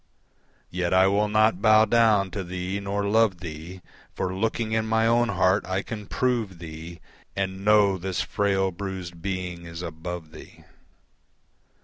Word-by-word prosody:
Yet 90 0 0
I 95 0 +6
will 100 +2 +2
not 110 -2 +3
bow 110 0 +6
down 110 -4 +3
to 95 +1 -4
thee 90 +2 -4
nor 100 +1 -2
love 110 -2 +3
thee, 85 +2 -8 0.3
For 95 -1 -2
looking 110 +3 -1
in 110 0 0
my 110 0 +2
own 120 +1 +3
heart 95 0 +2
I 95 +1 -1
can 105 -3 -7
prove 115 -8 -1
thee, 85 0 -9 0.4
And 95 0 -3
know 105 -2 +4
this 95 0 -3
frail, 95 -2 0
bruised 90 -2 -6
being 90 -2 -4
is 85 +1 -7
above 80 0 -6
thee. - - -14
95 Hz, 150 wpm, -25 LUFS, 90-105 Hz, 0.4 s, I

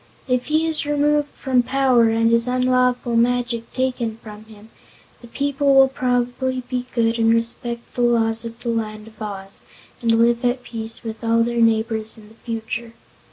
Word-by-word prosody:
"If 250 -1 0
he 310 +2 +2
is 320 -1 +2
removed 295 0 +1
from 260 -3 0
power 255 -2 +3
and 225 +1 +2
his 230 +1 +3
unlawful 250 -1 +1
magic 235 0 0
taken 250 -3 -2
from 215 -1 -12
him, 220 0 -16 0.5
the 240 - -12
people 280 +2 +1
will 270 0 +7
probably 255 0 -1
be 250 -1 -3
good 230 -1 +1
and 225 0 +4
respect 235 +1 -3
the 245 - -2
laws 225 -2 +2
of 230 0 -7
the 240 - -3
Land 215 -2 -3
of 220 -1 -22
Oz, 195 -2 -7 0.4
and 230 -1 +2
live 235 +1 +3
at 245 +1 0
peace 225 0 -7
with 225 0 -7
all 230 0 +3
their 235 0 -1
neighbors 220 -1 +1
in 210 -1 -15
the - - -17
future." 230 +1 -6
235 Hz, 175 wpm, -21 LUFS, 225-255 Hz, 0.5 s, will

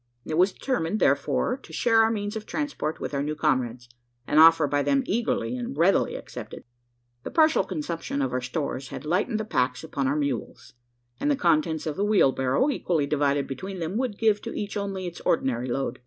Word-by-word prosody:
It - - -3
was 185 +4 +4
determined, 215 -5 -2
therefore, 140 - +1
to 270 - -16
share 225 -2 +3
our 220 - +4
means 205 -1 -3
of 215 -1 -6
transport 285 - -3
with - - -5
our 140 - 0
new 150 +2 -2
comrades 125 -6 -1 0.4
an 150 - +3
offer 165 -1 +7
by 145 0 +1
them 275 - +2
eagerly 240 +3 -1
and 250 +1 -5
readily 185 +4 +3
accepted. - - -8 0.6
The - - -6
partial 315 -7 +4
consumption 165 -4 -4
of 130 -3 -1
our 125 - 0
stores 130 +1 -3
had - - -8
lightened 195 +8 0
the 215 - -3
packs 125 - 0
upon 140 -4 -2
our 140 - +1
mules; 140 -5 -3 0.5
and 290 - 0
the 290 - +3
contents 160 - +1
of 155 -2 -3
the 200 - 0
wheelbarrow, 165 - +3
equally 165 - 0
divided 140 -1 +1
between 190 +8 -6
them, 170 +2 -4
would 245 -5 -2
give 215 -2 +2
to - - -5
each 205 -1 -4
only 195 -2 -3
its 175 -1 -7
ordinary 130 -5 0
load. 130 0 -2
165 Hz, 200 wpm, -26 LUFS, 140-215 Hz, 0.6 s, offer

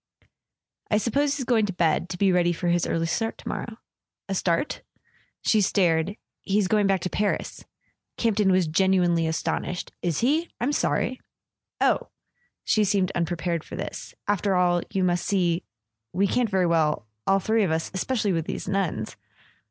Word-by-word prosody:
"I 210 - +3
suppose 280 +6 +1
he's 260 - -3
going 225 -3 +2
to 195 - -3
bed—to 175 +1 0
be 195 0 +3
ready 175 -1 +3
for 175 +1 -2
his 175 0 +2
early 165 0 0
start 225 +7 -1
to - - -12
morrow." 225 -1 -4 0.5
"A 195 - -2
start?" 180 - 0 0.6
She 215 - +3
stared. 185 -1 +2 0.2
"He's 200 -1 +1
going 210 0 +3
back 195 -2 +2
to 185 - -2
Paris." 205 0 -2 0.5
Campton 210 -4 +2
was 185 -1 +3
genuinely 175 0 +2
astonished. 170 +2 -2
"Is 170 -4 -1
he? 310 +8 +2
I'm 255 +4 0
sorry." 255 -3 0 0.6
"Oh - - +2 0.3
" 485 - -44
She 215 - +3
seemed 195 -2 +1
unprepared 170 -1 -1
for - - -9
this. - - -6
"After 200 -1 +1
all, 175 -1 +3
you 190 - 0
must 175 -1 +1
see—we 165 - -2
can't 240 +3 +1
very 190 -2 +2
well... 160 -8 +1 0.2
all 195 - +5
three 220 +3 +1
of 195 - +2
us... 160 0 -1
especially 210 +1 0
with 165 -1 -2
these - - -4
nuns. 185 - -1
185 Hz, 165 wpm, -25 LUFS, 170-210 Hz, 0.6 s, all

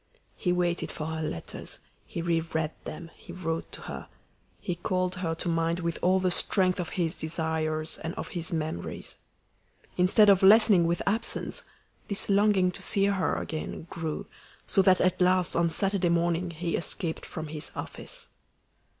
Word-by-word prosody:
He 180 - 0
waited 175 -1 0
for 155 - -5
her 160 0 -3
letters; 120 - -4 0.3
he 170 - -4
re 170 -1 +2
read 160 -1 -2
them; 165 +1 -7
he - - -12
wrote 165 -2 -3
to - - -5
her. - - -7 0.5
He 180 - -2
called 185 +1 -1
her 165 -3 -1
to 165 - -4
mind 165 +1 +1
with 170 -1 -2
all 185 +1 +4
the 185 -1 +1
strength 185 +1 +2
of 175 - -2
his 170 0 0
desires 160 -1 -1
and 165 +1 -5
of - - -5
his 170 -2 -2
memories. 155 - -4 0.8
Instead 185 +4 +5
of 195 -2 +6
lessening 200 -3 +7
with 170 0 0
absence, 220 +3 0 0.5
this 200 0 0
longing 200 -2 +4
to - - -8
see 195 -1 +3
her 200 -2 +1
again 155 0 -4
grew, 160 -2 -4 0.4
so 195 - +4
that 185 -1 +5
at 185 0 +2
last 185 0 +3
on 170 0 +3
Saturday 195 0 +1
morning 170 +1 +1
he 170 +1 -2
escaped 165 0 -2
from 160 -1 -6
his 150 -1 -2
office. - - -6
175 Hz, 165 wpm, -28 LUFS, 165-185 Hz, 0.8 s, lessening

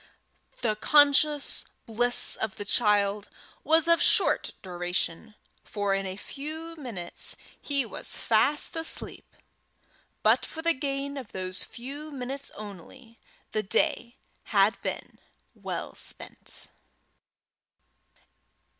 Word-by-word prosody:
The 220 -4 +1
conscious 290 +4 +4 0.2
bliss 245 +2 +3
of 220 -3 -3
the 205 - -5
child 205 -1 +2 0.3
was 325 +1 +4
of 335 0 +5
short - - +4
duration, 180 +3 -3 0.3
for 205 -2 -1
in 195 0 -1
a 185 - -5
few 315 +8 -7
minutes 225 - -4 0.3
he 280 -3 0
was 220 - -1
fast 260 +9 +2
asleep; 325 0 0 0.9
but - - +4
for 320 - -7
the 335 0 +4
gain 280 0 -3
of 255 -6 -8
those 185 0 0
few 280 +6 -8
minutes 275 0 -4
only, 215 +4 -11 0.3
the 215 - 0
day 235 +4 +1 0.3
had - - +3
been - - -5 0.3
well - - -5
spent. - - -4
245 Hz, 110 wpm, -28 LUFS, 205-290 Hz, 0.9 s, of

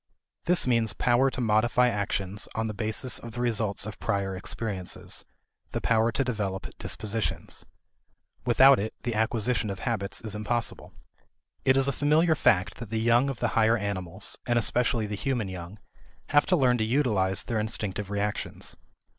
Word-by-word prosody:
This 180 0 +3
means 115 -3 +2
power 125 +2 +3
to 130 - -4
modify 120 +3 +3
actions 100 -2 -2
on 110 - 0
the 110 - -3
basis 110 +4 0
of 115 -1 -9
the 120 - -6
results 110 -5 0
of 110 -1 -7
prior 100 -1 -1
experiences, 95 -1 -4 0.5
the - - 0
power 115 0 +2
to 135 - +1
develop 105 -6 -3
dispositions. 110 +1 -3 0.8
Without 130 +2 +6
it, 110 +2 -3
the 120 - -1
acquisition 110 0 0
of 100 - -4
habits 100 -5 -2
is 110 -3 -3
impossible. 115 +3 -2 0.7
It 130 0 +5
is 135 0 +3
a - - +3
familiar 155 +4 +3
fact 95 -10 +2
that 115 -3 -8
the 110 0 -1
young 120 +4 +3
of 135 -4 -5
the 120 - +2
higher 115 +1 +3
animals, 95 -2 -3
and 120 -1 +2
especially 120 -1 +1
the 105 - -5
human 115 -1 -1
young, 90 +2 -8 0.5
have 145 0 +4
to 185 - +4
learn 125 -6 +3
to - - +2
utilize 110 -7 +1
their 115 -2 -2
instinctive 105 -2 -3
reactions. 105 0 -3
110 Hz, 165 wpm, -27 LUFS, 100-125 Hz, 0.8 s, Without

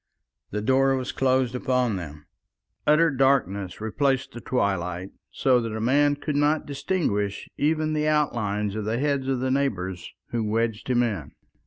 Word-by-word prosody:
The 105 0 -3
door 135 +2 +3
was 130 -1 -3
closed 130 -2 +1
upon 125 -3 0
them, 75 -5 -7 0.6
utter 160 +2 +5
darkness 125 -9 +1
replaced 130 +5 0
the 120 - -9
twilight, 95 -6 -1 0.2
so 125 -2 +2
that 115 -2 -4
a - - -3
man 145 +5 +3
could 145 0 -4
not 150 +2 +2
distinguish 135 - -1
even 155 +1 +1
the 155 0 0
outlines 105 -9 0
of 110 - -3
the 110 +2 -1
heads 140 -1 0
of 130 -2 0
the 130 0 0
neighbours 95 -10 -2 0.2
who 115 -2 -1
wedged 110 0 -1
him 125 -1 +3
in. 100 - -3
125 Hz, 160 wpm, -25 LUFS, 105-140 Hz, 0.6 s, utter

